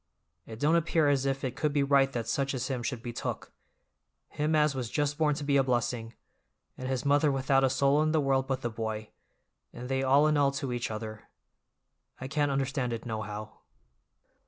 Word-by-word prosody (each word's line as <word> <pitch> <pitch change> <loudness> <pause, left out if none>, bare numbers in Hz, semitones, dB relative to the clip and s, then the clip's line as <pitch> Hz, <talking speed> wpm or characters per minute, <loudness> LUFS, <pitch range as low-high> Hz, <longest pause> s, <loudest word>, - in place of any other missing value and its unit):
It 110 -1 -9
don't 150 +4 +3
appear 160 -2 +2
as 140 -1 +1
if 135 0 -1
it 130 -2 -3
could 150 +2 0
be 145 -1 +2
right 140 -1 +3
that 115 -2 -3
such 140 0 -1
as 125 +1 -3
him 130 -3 -2
should 120 -1 -4
be 120 - -5
took—him 150 +5 -6
as 150 -1 +3
was 125 -4 -4
just 145 +1 -1
born 150 -2 +3
to 145 - -5
be 140 -1 +2
a 135 - +4
blessing, 120 -2 -1 0.6
and 130 - -6
his 130 +1 -2
mother 145 +1 +4
without 135 0 +2
a 135 - +4
soul 140 +3 +3
in 155 0 +2
the 160 - +2
world 135 -2 +1
but 135 -1 -2
the 120 - -2
boy, 110 -1 -4 0.6
and 125 +1 -8
they 135 0 0
all 135 +3 +4
in 155 -1 +3
all 140 -1 +4
to 140 -3 -3
each 120 0 -2
other. 110 0 -7 0.9
I 130 - -5
can't 145 +1 0
understand 135 -2 -1
it, 115 - -5
nohow." 110 -1 -6
135 Hz, 205 wpm, -29 LUFS, 120-145 Hz, 0.9 s, a